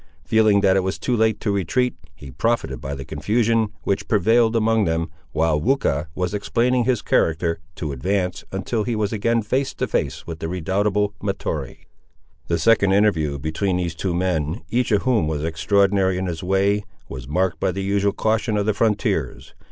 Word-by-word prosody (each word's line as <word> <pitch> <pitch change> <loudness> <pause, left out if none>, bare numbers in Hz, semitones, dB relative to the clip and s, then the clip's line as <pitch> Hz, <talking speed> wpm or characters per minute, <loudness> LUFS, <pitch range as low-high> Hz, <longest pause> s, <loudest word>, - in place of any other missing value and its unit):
Feeling 110 -2 +4
that 95 -1 +4
it - - +4
was 95 +1 -2
too 125 - -1
late 110 -2 +2
to 105 - 0
retreat, 110 +6 0 0.2
he 70 -6 -11
profited 65 - -1
by 70 +1 -4
the 70 -1 -7
confusion 115 - +1
which 100 - -1
prevailed 115 +3 +3
among 115 -1 +2
them, 80 -1 -1 0.2
while 80 -1 +1
Weucha 85 - +1
was 90 +1 -2
explaining 120 +4 +1
his 125 -3 +1
character, 85 +1 +1 0.2
to 75 -3 -4
advance, 90 +6 -1
until 100 +4 -2
he 120 +1 -2
was 105 0 -1
again 115 +2 +1
face 130 +6 -1
to - - -1
face - - -2
with 80 -1 -7
the 80 - -3
redoubtable 100 +4 0
Mahtoree. 80 -9 -4 0.6
The 85 - +1
second 100 -3 +3
interview 80 -9 +2
between 80 +6 -1
these 85 -2 -2
two 85 +2 -2
men, 85 0 -1
each 125 0 +1
of 105 -2 +2
whom 120 -11 +2
was 75 -1 -2
extraordinary 95 +3 +2
in 95 - -2
his 85 -3 -4
way, 100 +3 +1 0.2
was 65 -2 -8
marked 90 +3 0
by - - +1
the 95 +2 -4
usual 100 +1 +1
caution 110 0 0
of 100 - 0
the 110 - +2
frontiers. 105 -1 -1
100 Hz, 185 wpm, -22 LUFS, 85-110 Hz, 0.6 s, Feeling